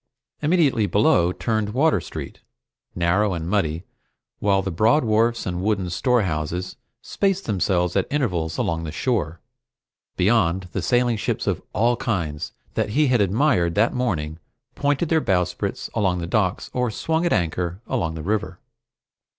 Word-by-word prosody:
Immediately 150 - +2
below 90 -4 +3
turned 110 +1 -2
Water 145 - +3
Street, - - -8 0.5
narrow 90 +3 +1
and 80 -1 -4
muddy, 85 -4 0 0.6
while 100 -1 +2
the 95 - -3
broad 110 - +3
wharves 115 +1 +1
and 90 -1 -3
wooden 100 -3 0
storehouses 90 - 0 0.3
spaced 195 -1 0
themselves 90 -3 0
at 100 - +1
intervals 90 - -1
along 80 0 -1
the 80 - -5
shore. 90 - -1 0.8
Beyond, 95 -3 +2
the - - -2
sailing 120 -2 +2
ships 105 - -2
of - - -1
all 120 +2 +2
kinds 80 -11 -2 0.2
that - - -1
he 145 +6 +2
had 125 -4 +3
admired 100 - +2
that 110 +3 +3
morning 80 -11 -2 0.3
pointed 145 +3 0
their 160 -1 +3
bowsprits 90 -6 -1
along 95 -5 +1
the 85 - -3
docks 95 0 -1
or 125 -1 0
swung 160 +9 -1
at 175 - +1
anchor 85 +1 -1
along 80 -3 -2
the 80 - -6
river. 100 -1 -2
100 Hz, 150 wpm, -23 LUFS, 85-120 Hz, 0.8 s, below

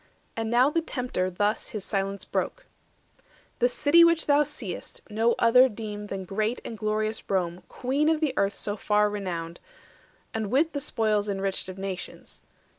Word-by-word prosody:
And 225 -1 -2
now 250 +5 +4
the 330 - +1
Tempter 250 - -2
thus 205 +4 -1
his 210 -3 -6
silence 195 -1 -2
broke:— - - -3 0.9
"The 245 - +4
city 300 +6 +5
which 335 -1 +4
thou 290 0 +4
seest 270 -11 -5
no 225 +3 +2
other 250 +3 +6
deem 210 -2 -6
Than 195 -2 -5
great 215 +5 -1
and 230 - -5
glorious 215 0 -2
Rome, 180 -2 -1
Queen 280 +5 0
of 320 -1 +2
the 305 -4 0
Earth 200 0 +1
So 205 - -3
far 210 0 +2
renowned, 170 -5 -4 0.7
and 220 -2 -2
with 295 +7 +2
the 285 - -3
spoils 215 -5 0
enriched 195 -1 -1
Of 185 - -8
nations. 195 -1 -7
215 Hz, 165 wpm, -27 LUFS, 195-255 Hz, 0.9 s, other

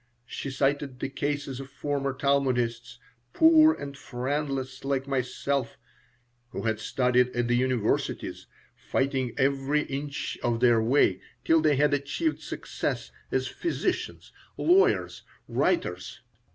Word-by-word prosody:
She 135 - -5
cited 135 0 -1
the - - -3
cases 140 -1 -3
of 135 0 -8
former 140 0 -2
Talmudists, 125 -4 0 0.4
poor 320 -1 +7
and 140 0 -7
friendless 135 0 -3
like 135 -1 -1
myself, 135 -1 -2 0.7
who - - -6
had 110 -2 0
studied 125 +1 +2
at 120 0 0
the 120 - +1
universities, 125 -3 -1 0.3
fighting 135 -2 -1
every 140 +2 +1
inch 140 0 -4
of 120 -1 0
their 120 -2 +4
way, 110 -5 +3 0.2
till 160 0 +4
they 155 -2 +3
had 145 +2 +3
achieved 145 - -1
success - - -4 0.2
as - - 0
physicians, 340 - -3 0.3
lawyers, 390 +4 +3 0.3
writers. - - -1
135 Hz, 120 wpm, -27 LUFS, 125-145 Hz, 0.7 s, poor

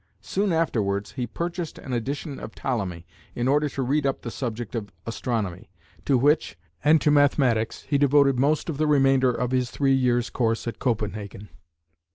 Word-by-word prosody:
Soon 200 0 0
afterwards 100 - 0
he 120 +3 -4
purchased 170 +5 -4
an 130 - -7
edition 140 +4 -3
of - - -9
Ptolemy 95 -9 -3 0.3
in 120 +1 -1
order 145 +2 +2
to 135 0 -3
read 140 +3 +1
up 135 - -2
the 115 - -5
subject 120 -2 -5
of 105 -4 -4
astronomy, 110 -6 -3 0.4
to 135 - +3
which, 145 +5 +2 0.3
and 155 +2 +5
to 150 - +3
mathematics, 135 -6 +2
he 140 - 0
devoted 140 -2 +4
most 150 +3 +2
of 155 -4 -4
the 155 - +2
remainder 135 -3 +4
of 125 0 -2
his 125 -1 +1
three 135 0 +1
years' 120 -2 +1
course 115 -1 0
at 115 - -4
Copenhagen. 105 -4 -3
130 Hz, 175 wpm, -25 LUFS, 115-145 Hz, 0.4 s, and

